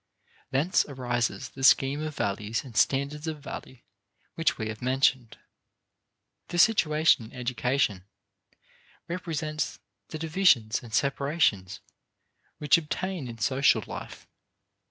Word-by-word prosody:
Thence 145 +8 +2
arises 120 -4 -2
the 135 - -9
scheme 135 +2 +4
of 155 -1 -4
values 105 -1 -2
and 125 -5 -12
standards 140 +7 +1
of 155 -1 -4
value 130 -3 -9 0.5
which 165 - 0
we 110 - -3
have 110 -1 -7
mentioned. 130 -2 +1 1.1
This 175 -1 +5
situation 155 - +3
in - - -14
education 125 -5 -1 1.0
represents 160 -3 -3 0.3
the 155 - -6
divisions 155 - +2
and 120 - -12
separations 140 - 0 0.8
which 150 +1 +4
obtain 170 -1 -4
in 115 -1 -8
social 130 +5 +2
life. - - -9
135 Hz, 115 wpm, -27 LUFS, 120-155 Hz, 1.1 s, This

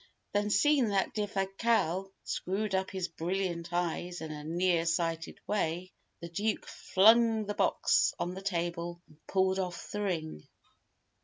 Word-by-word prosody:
Then, 205 0 +1
seeing 270 +4 +4
that 200 -2 +1
Defasquelle 195 -2 0
screwed 195 +2 -2
up 190 0 +1
his 185 -2 -3
brilliant 175 0 -3
eyes 175 0 -2
in 160 -1 -6
a 150 -1 -7
near 170 +1 +1
sighted 165 0 -1
way, 185 -2 -1 0.3
the 170 - -5
Duke 205 +6 -1
flung 220 +2 +4
the 205 - -2
box - - +3
on 175 - -2
the 190 - -7
table, 175 -2 -2
and 155 - -20
pulled 190 0 +2
off 180 -2 -4
the 210 - -3
ring. 160 - -3
185 Hz, 145 wpm, -31 LUFS, 170-205 Hz, 0.3 s, seeing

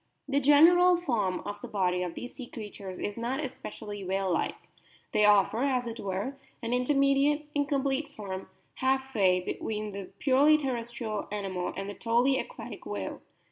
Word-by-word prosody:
The 280 0 +2
general 340 +6 +6
form 220 - 0
of 205 0 -6
the - - -6
body 180 -3 0
of 180 -2 -3
these 245 - -7
sea 255 -3 -8
creatures 205 -5 -8
is 205 +2 -4
not 245 +3 -1
especially 220 -7 -6
whale 190 0 0
like; - - 0 0.6
they 210 - +4
offer, 210 +2 +4
as 260 -3 +1
it 230 0 -6
were, 200 +8 -3 0.2
an 230 +1 -1
intermediate, 275 +3 +3
incomplete 280 0 0
form, 195 -8 -7 0.3
half 265 0 0
way 185 -4 +4
between 210 +3 -3
the 200 -1 -6
purely 285 +3 +5
terrestrial 235 -6 -3
animal 195 -3 -2
and 195 0 -3
the 205 - -5
totally 240 +5 +2
aquatic - - -7
whale. - - -4
235 Hz, 160 wpm, -29 LUFS, 200-275 Hz, 0.6 s, general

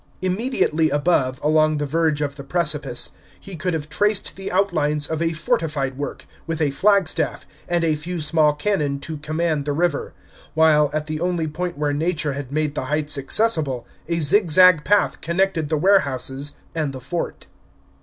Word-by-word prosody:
Immediately 185 - +1
above, 140 -4 +1
along 155 0 +3
the 145 - -1
verge 155 0 0
of 140 -1 -2
the 140 - -9
precipice, 150 -4 -1 0.3
he 195 - -9
could 170 +1 -2
have 150 -2 -4
traced 205 +6 +1
the 195 0 -6
outlines 155 -6 +1
of 160 +1 -3
a 165 0 +1
fortified 150 -4 -1
work, 145 +2 -6 0.2
with 165 -1 -3
a 150 -3 +1
flagstaff, 195 +4 +1 0.2
and 175 -1 +1
a 160 -1 +2
few 170 +4 -4
small 150 -1 +2
cannon 150 -4 -1
to 155 +1 -6
command 155 -1 -1
the 145 - -1
river; 165 -1 -1 0.4
while, 155 -2 +4
at 150 0 -2
the 155 0 -4
only 175 -2 0
point 175 +2 -4
where 145 -1 0
Nature 155 -1 -1
had 140 -1 -6
made 150 0 -1
the 150 - -3
heights 150 +2 0
accessible, 140 - +1 0.2
a 170 0 -1
zigzag 180 0 +5
path 205 +1 +2
connected 170 -2 0
the 155 - +1
warehouses 145 -6 +1 0.2
and 155 -4 -2
the 130 - -7
fort. 170 +7 -5
155 Hz, 170 wpm, -22 LUFS, 145-175 Hz, 0.4 s, zigzag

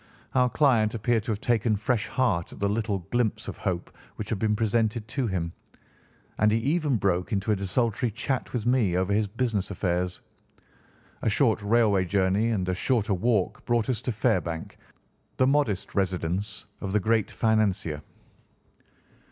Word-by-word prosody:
Our 125 -1 +3
client 120 -7 +3
appeared 115 0 +1
to 120 - -1
have 105 - -3
taken 115 -2 +2
fresh 110 +2 0
heart 105 -10 0
at - - -11
the 100 - +1
little 105 -3 -1
glimpse 120 -3 0
of - - -5
hope 90 -2 -3 0.2
which 105 - -6
had 110 - -1
been 105 0 +1
presented 110 0 0
to 135 -4 -1
him, 85 -4 -2 0.9
and 105 +1 +4
he 110 - +3
even 145 +3 +1
broke 90 0 0
into 100 +1 0
a - - +3
desultory 115 +5 0
chat 120 +4 -3
with 120 -3 -3
me 120 -8 +2
over 95 +2 +1
his 105 0 +2
business 110 -2 -1
affairs. 90 -2 -1 1.0
A - - +1
short 110 -1 +2
railway 105 -3 +3
journey 100 +4 +2
and 95 -5 -1
a 90 - +1
shorter 110 +2 +1
walk 105 0 0
brought 120 0 +1
us 115 -2 -3
to 125 - -2
Fairbank, 90 -8 -1 0.6
the 130 - +4
modest 135 -8 +1
residence 95 +1 -1
of 95 -1 -4
the 105 - +4
great 110 0 +1
financier. 100 -9 0
105 Hz, 165 wpm, -27 LUFS, 95-120 Hz, 1.0 s, and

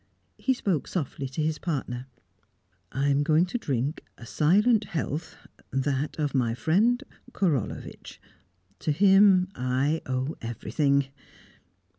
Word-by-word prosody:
He 260 - +1
spoke 190 - -1
softly 140 -5 -3
to 150 +4 -2
his 155 0 -1
partner. 130 -6 -3 0.8
"I 140 +2 0
am 140 0 +3
going 155 +3 +3
to 240 +7 -3
drink 140 - -2
a 115 - -11
silent 205 - +3
health 160 0 -4 0.3
that 135 +2 -1
of 150 -2 -1
my 120 -4 +1
friend 220 - +2 0.3
Korolevitch. 155 - -2 0.6
To 155 - -1
him 190 +2 +5
I 130 +5 0
owe 130 +3 -2
everything." 135 +5 0
150 Hz, 120 wpm, -27 LUFS, 135-180 Hz, 0.8 s, him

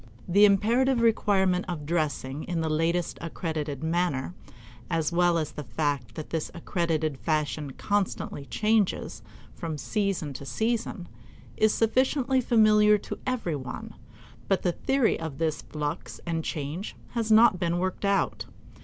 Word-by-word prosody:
The 200 +4 +6
imperative 235 +6 +3
requirement 195 -5 +3
of 165 -5 -4
dressing 150 -3 -1
in 175 -2 -2
the 160 -1 -1
latest 165 +2 0
accredited 160 -4 -4
manner, 165 -3 0 0.6
as 165 -2 0
well 175 0 +3
as 155 -2 -2
the 150 - -7
fact 130 -2 -2
that 155 - -7
this 160 -2 -2
accredited 160 -5 -1
fashion 150 -3 -1
constantly 200 -7 -2
changes 215 -2 0 0.3
from 165 -4 -5
season 185 -2 -1
to 135 - -7
season, 220 - -2 0.5
is 215 0 +3
sufficiently 260 +4 +2
familiar 215 -3 +5
to - - -7
every 230 -11 -1
one, 130 -3 -6 0.5
but 195 - +1
the 180 - +2
theory 265 +6 +1
of 160 -4 -5
this 160 -2 -1
flux 150 -1 -5
and 165 -2 -2
change 155 +7 -4 0.2
has 225 -2 -1
not 220 -4 +6
been 170 -1 0
worked 185 +2 -2
out. 200 -1 +1
175 Hz, 140 wpm, -27 LUFS, 155-210 Hz, 0.6 s, The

